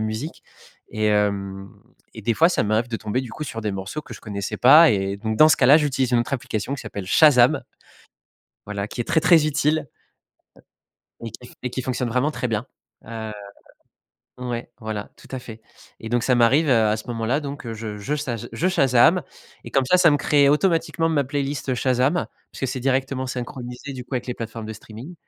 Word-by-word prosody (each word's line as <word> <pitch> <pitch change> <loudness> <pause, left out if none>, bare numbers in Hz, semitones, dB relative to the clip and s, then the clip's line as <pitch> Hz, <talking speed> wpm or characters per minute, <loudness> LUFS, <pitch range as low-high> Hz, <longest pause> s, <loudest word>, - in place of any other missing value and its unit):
musique 110 +9 -4 0.5
et 110 0 -1
hem 100 -2 0 0.5
et - - -9
des 115 - +1
fois, 165 +2 +5
ça 180 - 0
m'arrive 110 +3 0
de 115 - -3
tomber, 110 +4 -2
du 125 -3 -8
coup, 155 - -5
sur 115 -3 -6
des 105 -1 -2
morceaux 95 +10 -5
que - - -10
je - - -12
connaissais 100 -3 -5
pas 150 +4 +8
et 100 0 -1
donc 110 0 -3
dans 155 - +7
ce - - +4
cas-là, 135 +3 +6
j'utilise 135 -4 0
une 120 - +4
autre 120 - -4
application 120 +1 -3
qui 140 - -7
s'appelle 100 -2 -7
Shazam 125 0 +5 1.0
voilà 100 -1 -4
qui 120 - -4
est - - -3
très, 160 - +2
très 160 -2 +5
utile 150 0 0 1.3
et 115 -2 -6
qui 125 +2 -12
f - - -16
et 125 - -2
qui 130 - -4
fonctionne 125 -1 -2
vraiment 130 +6 +1
très 125 - -3
bien, 110 +1 -2 0.4
heu 110 -1 -6 1.1
ouais, 120 -1 -5
voilà, 110 -2 -5
tout - - -17
à - - -3
fait 115 -2 -11 0.4
et 110 - -7
donc 120 0 0
ça 125 - +2
m'arrive, 135 +6 +4
heu, 115 -4 +4
à 105 +1 +1
ce 110 - -9
moment-là 120 +4 -1
donc 140 -5 -6
je 110 -1 -6
je 135 +9 -2
saj 120 -5 -4
je 180 - 0
Shazam 140 +2 +4 0.4
et - - -8
comme 135 -1 +2
ça, 180 - +4
ça 170 -3 +6
me 145 - +3
crée 140 -1 +3
automatiquement 165 +1 +1
ma 145 -4 +1
playlist 140 -1 -2
Shazam 130 +7 +1 0.3
puisque 135 -2 -3
c'est 130 - -4
directement 130 0 -1
synchronisé, 125 +1 -6
du 125 -2 -7
coup, 130 - -7
avec 125 - -3
les 125 - -3
plateformes 115 -1 -7
de 110 - -5
streaming 115 - -11
125 Hz, 205 wpm, -23 LUFS, 110-140 Hz, 1.3 s, pas